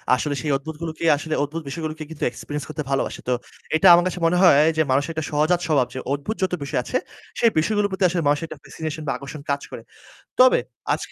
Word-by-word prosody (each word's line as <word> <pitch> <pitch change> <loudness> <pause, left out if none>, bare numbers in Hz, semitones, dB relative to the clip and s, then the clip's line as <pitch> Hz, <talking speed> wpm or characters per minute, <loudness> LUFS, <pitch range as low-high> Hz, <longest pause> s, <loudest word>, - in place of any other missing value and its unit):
আসলে 145 -2 -2
সেই 150 - -1
অদ্ভুতগুলোকে 160 +2 -6
আসলে 155 +2 -4
অদ্ভুত 155 +3 -4
বিষয়গুলোকে 155 +1 -5
কিন্তু 160 -2 -7
experience 145 +4 -6
করতে 155 0 -4
ভালোবাসে। 135 - -1
তো - - +3 0.4
এটা 190 +5 +5
আমার 175 0 +6
কাছে 180 - -4
মনে 170 +2 +3
হয় 160 -6 +7 0.2
যে - - +4
মানুষের 140 +4 +1
একটা 160 -1 -3
সহজাত 155 +4 +2
স্বভাব 140 -6 +2
যে 130 - -4
অদ্ভুত 145 +10 -3
যত 185 - 0
বিষয় 140 - -1
আছে। - - -1 0.4
সেই 230 - +5
বিষয়গুলোর 205 +4 +1
প্রতি 190 0 -2
আসলে 170 0 -1
মানুষের 145 +3 +1
একটা - - -9
fascination 160 0 -6
বা - - +1
আকর্ষণ 140 +2 -9
কাজ 140 0 0
করে। - - -7 0.6
তবে 255 0 +7 0.3
আজকে - - -5
155 Hz, 210 wpm, -23 LUFS, 145-170 Hz, 0.6 s, হয়